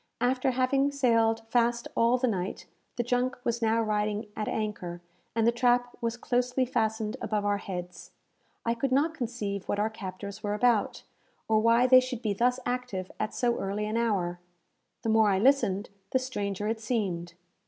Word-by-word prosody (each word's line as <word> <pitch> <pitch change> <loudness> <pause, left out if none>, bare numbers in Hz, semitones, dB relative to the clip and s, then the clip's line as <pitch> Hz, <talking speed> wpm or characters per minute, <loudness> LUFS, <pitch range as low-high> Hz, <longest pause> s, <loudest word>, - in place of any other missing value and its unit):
After 255 +2 +1
having 260 +2 +2
sailed 230 -5 +2
fast 235 0 +2
all 235 +2 +4
the 255 - +1
night, 190 -5 -3 0.3
the 240 - 0
junk 245 +1 0
was 235 0 -1
now 225 0 +2
riding 210 0 -1
at 215 - -3
anchor, 205 -5 -3 0.4
and 225 -1 +2
the 235 - +5
trap 245 0 +2
was 230 0 -1
closely 250 +1 0
fastened 220 -1 -1
above 210 -1 -1
our 205 0 +1
heads. 180 -2 -7 0.6
I 230 - +2
could 250 +3 -2
not 295 +5 +2
conceive 220 - -4
what - - 0
our 215 +2 0
captors 200 0 -7
were 205 -1 -1
about, 230 -1 +2 0.4
or 220 -1 +3
why 230 +2 +4
they 255 0 +8
should 255 -2 -4
be 210 -2 +1
thus 250 +5 +1
active 245 -7 -3
at 215 - -2
so 240 -1 +1
early 200 +2 -2
an 215 +1 -3
hour. 195 -7 0 0.6
The 225 - -1
more 220 -1 +5
I 195 - +2
listened, 210 -5 +2 0.2
the - - +2
stranger 205 -6 -3
it 225 +1 -1
seemed. 185 -7 -2
225 Hz, 175 wpm, -28 LUFS, 205-245 Hz, 0.6 s, they